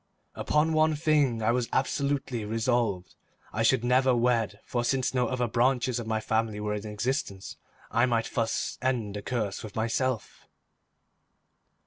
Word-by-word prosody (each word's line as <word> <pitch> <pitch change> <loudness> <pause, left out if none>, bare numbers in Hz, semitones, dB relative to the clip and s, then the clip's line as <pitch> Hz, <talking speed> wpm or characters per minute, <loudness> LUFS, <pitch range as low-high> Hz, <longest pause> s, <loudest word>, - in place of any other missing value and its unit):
Upon 155 +2 +1
one 155 0 +3
thing 145 -7 +2
I 110 - +3
was 120 -1 0
absolutely 135 -3 -1
resolved. 110 -3 0 0.4
I 110 - -1
should 115 +1 +3
never 130 +1 +3
wed, 115 -4 +1
for 120 -1 -1
since 130 +1 0
no 125 -1 +1
other 125 -1 -1
branches 125 +1 +1
of 115 - -6
my 110 0 0
family 110 -1 -1
were 105 0 -2
in 105 +1 -4
existence, 105 -2 -3 0.3
I 120 +2 +3
might 115 -2 +1
thus 115 -2 -1
end 120 -6 -1
the 105 - -4
curse 110 -4 -3
with 105 -2 -9
myself. 115 +1 -2
120 Hz, 150 wpm, -28 LUFS, 110-130 Hz, 0.4 s, one